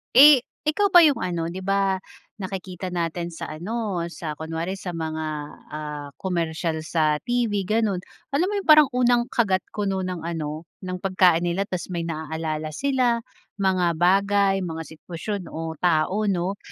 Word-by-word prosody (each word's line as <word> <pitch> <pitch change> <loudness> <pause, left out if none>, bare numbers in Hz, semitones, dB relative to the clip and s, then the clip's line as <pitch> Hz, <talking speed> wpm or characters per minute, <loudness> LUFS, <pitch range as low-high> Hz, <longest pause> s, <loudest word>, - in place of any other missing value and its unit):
Eh, 280 0 +9 0.2
ikaw 395 +7 +2
ba 350 -3 +8
'yung 285 -6 +3
ano, 170 -2 -1
'di 190 - -5
ba 195 0 +1 0.4
nakikita 185 -1 -5
natin 170 -1 -2
sa 165 - -7
ano, 185 +1 -3
sa 165 -2 -5
kunwari 165 +4 -4
sa 185 - -5
mga, 160 -1 -3 0.4
ah, 150 -1 -5
komersiyal 165 -3 -2
sa 155 -1 +1
TV 235 -4 0
gano'n, 215 -3 +1 0.3
alam 320 +6 +2
mo 415 - -3
'yung 395 - -4
parang 305 -3 +8
unang 245 -1 +2
kagat 195 -6 +2
kuno 195 -3 -1
ng 180 -3 -4
ano, 160 -1 -4 0.2
ng 185 -1 -4
pagkain 180 -2 +3
nila 175 +3 0
ta's 185 0 -4
may 170 - -1
naalala 155 -1 -3
sila, 255 - +1 0.4
mga 185 -2 +2 0.2
bagay, 195 +2 +4
mga 165 -1 -4
sitwasyon, 180 +4 -5
o 160 0 -5
tao 180 +5 +2
'no. 190 0 0
185 Hz, 155 wpm, -24 LUFS, 165-210 Hz, 0.4 s, Eh